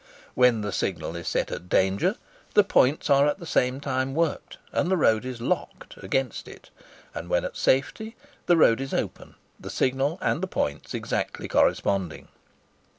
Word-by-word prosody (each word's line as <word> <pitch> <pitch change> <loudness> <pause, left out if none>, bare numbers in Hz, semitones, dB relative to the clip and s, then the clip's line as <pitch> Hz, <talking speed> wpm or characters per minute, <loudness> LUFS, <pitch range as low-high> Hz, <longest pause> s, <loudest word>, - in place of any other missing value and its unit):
When 125 -3 +4
the 105 -1 -3
signal 85 - -3
is 85 -1 -6
set - - -1
at 90 - -7
"Danger," 95 +1 +2 0.4
the - - +7
points 135 +4 +2
are 140 +1 +5
at 150 - 0
the 175 - -10
same 125 -4 +1
time 135 -1 -2
worked, 165 -2 -1
and 175 - 0
the 190 - +2
road 110 -6 +3
is 130 -2 -5
"locked" 115 - -3
against 135 -3 -2
it; - - -14 0.4
and 85 - -7
when 90 - +1
at - - -6
"Safety," 220 - 0 0.3
the 175 - +5
road 115 -5 +5
is 135 - -3
open,—the - - -6
signal 135 +5 0
and 180 - 0
the 190 - -1
points 75 - -3
exactly - - -3
corresponding. 95 -5 0
130 Hz, 165 wpm, -26 LUFS, 105-145 Hz, 0.4 s, the